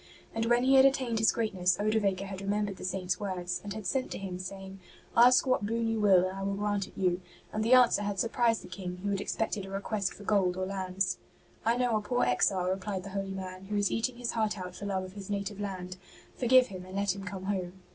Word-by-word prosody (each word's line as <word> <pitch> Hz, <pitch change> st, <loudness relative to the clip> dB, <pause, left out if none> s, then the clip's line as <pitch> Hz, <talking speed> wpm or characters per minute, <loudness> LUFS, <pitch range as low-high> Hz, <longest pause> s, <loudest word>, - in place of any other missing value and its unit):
And 225 Hz, 0 st, -1 dB
when 240 Hz, +1 st, +3 dB
he 265 Hz, +1 st, +4 dB
had 265 Hz, 0 st, +8 dB
attained 260 Hz, -4 st, +2 dB
his 220 Hz, -, +5 dB
greatness 185 Hz, -6 st, +1 dB
Odovaker 205 Hz, -2 st, +1 dB
had 195 Hz, -1 st, -6 dB
remembered 200 Hz, 0 st, -1 dB
the -, -, -9 dB
Saint's 185 Hz, -1 st, -1 dB
words, 185 Hz, -3 st, -3 dB
and 205 Hz, -, -6 dB
had 215 Hz, -2 st, -6 dB
sent 260 Hz, +7 st, 0 dB
to -, -, -5 dB
him 185 Hz, -2 st, -5 dB
saying, 190 Hz, +1 st, -7 dB, 0.2 s
'' -, -, -26 dB
Ask 245 Hz, +2 st, +7 dB
what 255 Hz, -5 st, +1 dB
boon 230 Hz, +2 st, 0 dB
you 225 Hz, -1 st, 0 dB
will, 190 Hz, -3 st, +5 dB
and 185 Hz, -, -6 dB
I 195 Hz, -, -5 dB
will 195 Hz, 0 st, -1 dB
grant 205 Hz, -1 st, -1 dB
it -, -, -18 dB
you." 180 Hz, -1 st, +1 dB, 0.3 s
And 215 Hz, -, 0 dB
the 230 Hz, +3 st, +4 dB
answer 245 Hz, -4 st, +5 dB
had 205 Hz, -1 st, -2 dB
surprised 230 Hz, +1 st, +1 dB
the -, -, -10 dB
King, 180 Hz, 0 st, -6 dB
who 200 Hz, -, 0 dB
had 195 Hz, -1 st, -1 dB
expected 215 Hz, -2 st, -2 dB
a 195 Hz, -, -8 dB
request 200 Hz, 0 st, -2 dB
for 205 Hz, -, -11 dB
gold 190 Hz, -3 st, +2 dB
or 185 Hz, -, -1 dB
lands. 185 Hz, -1 st, -1 dB, 0.2 s
*' -, -, -30 dB
I 235 Hz, +1 st, +3 dB
know 245 Hz, -2 st, +2 dB
a -, -, -2 dB
poor 245 Hz, +4 st, 0 dB
exile," 180 Hz, +9 st, +2 dB
replied 190 Hz, 0 st, -2 dB
the 200 Hz, -, -7 dB
holy 195 Hz, 0 st, -3 dB
man, 185 Hz, 0 st, -7 dB
'' -, -, -15 dB
who 210 Hz, -, -1 dB
is 205 Hz, -1 st, +2 dB
eating 240 Hz, +2 st, -1 dB
his 240 Hz, -1 st, -2 dB
heart 215 Hz, -2 st, 0 dB
out 180 Hz, -1 st, -6 dB
for 205 Hz, -, -6 dB
love 190 Hz, -2 st, -1 dB
of 185 Hz, 0 st, -9 dB
his 200 Hz, -1 st, -9 dB
native 200 Hz, 0 st, -3 dB
land. 185 Hz, -2 st, -5 dB, 0.4 s
Forgive 255 Hz, 0 st, +5 dB
him 185 Hz, -2 st, -7 dB
and 185 Hz, +1 st, -10 dB
let 200 Hz, -1 st, +1 dB
him 195 Hz, -, -7 dB
come 190 Hz, 0 st, -6 dB
home." 190 Hz, -2 st, -2 dB
200 Hz, 255 wpm, -30 LUFS, 185-220 Hz, 0.4 s, had